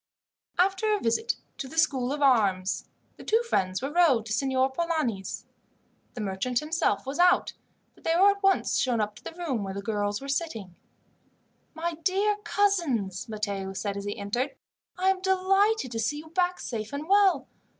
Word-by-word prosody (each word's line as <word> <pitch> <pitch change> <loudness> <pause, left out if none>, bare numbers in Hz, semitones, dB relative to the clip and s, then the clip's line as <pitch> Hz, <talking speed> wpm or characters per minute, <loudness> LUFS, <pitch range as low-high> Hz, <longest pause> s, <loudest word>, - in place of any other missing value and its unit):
After 385 +4 +2
a - - -2
visit 235 - 0 0.2
to 270 - -4
the 320 - -11
School 270 -5 +2
of 290 0 -1
Arms, 200 -8 +2 0.3
the - - -11
two 450 +2 +2
friends 190 - 0
were 275 - -2
rowed 305 -11 +4
to 220 - -3
Signor 265 +2 +1
Polani's. 265 - -2 0.7
The 240 - -4
merchant 205 +5 -2
himself 305 - 0
was 275 +5 -5
out, 360 0 +4 0.4
but - - -23
they 330 - +1
were 390 +3 +6
at 400 0 -6
once 390 -1 +2
shown 245 -3 +1
up 210 -1 -1
to - - -16
the - - -7
room 295 -11 -2
where 195 0 -5
the 200 - -4
girls 205 -1 -1
were 275 - -8
sitting. 275 - -3 1.0
"My 330 0 -3
dear 405 +2 +2
cousins," 300 - 0
Matteo 200 -3 -3
said 200 +1 -3
as 200 0 -5
he 205 - -4
entered, 240 +7 -2 0.4
"I 375 +1 +3
am 380 -1 -3
delighted 380 - +2
to 225 - -3
see 225 +7 0
you 315 +1 -9
back 360 +1 0
safe 220 -3 -5
and 290 +2 -4
well. 395 -1 +4
275 Hz, 180 wpm, -27 LUFS, 215-360 Hz, 1.0 s, were